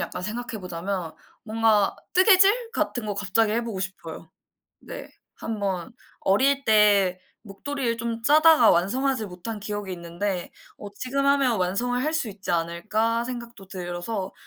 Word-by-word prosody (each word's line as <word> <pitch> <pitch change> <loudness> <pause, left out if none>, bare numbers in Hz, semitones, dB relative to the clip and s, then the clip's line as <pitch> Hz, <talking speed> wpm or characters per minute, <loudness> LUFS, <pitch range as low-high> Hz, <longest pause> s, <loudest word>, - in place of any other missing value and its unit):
약간 - - -4
생각해 225 +2 -5
보자면 180 -1 -4 0.3
뭔가 220 -2 +2 0.2
뜨개질 395 +5 +5
같은 245 - -2
거 205 - -2
갑자기 205 +2 +1
해 235 +1 0
보고 215 -5 -5
싶어요. 165 -4 -7 0.5
네. - - -9 0.3
1 225 -1 -5
번 185 -4 -2 0.3
어릴 270 +8 +2
때 205 -4 +4 0.2
목도리를 235 +4 -3
좀 230 0 -3
짜다가 305 -2 +6
완성하지 225 +6 +1
못한 185 +4 -7
기억이 205 -2 -5
있는데 175 +2 -4 0.3
어 205 - -7
'지금 275 +4 -2
하면 275 -5 +3
완성을 235 +8 0
할 310 +2 0
수 315 -8 -1
있지 200 -1 -7
않을까.' 215 +8 0
생각도 235 -5 -8
들어서 185 +2 -5
215 Hz, 295 characters per minute, -25 LUFS, 190-245 Hz, 0.5 s, 짜다가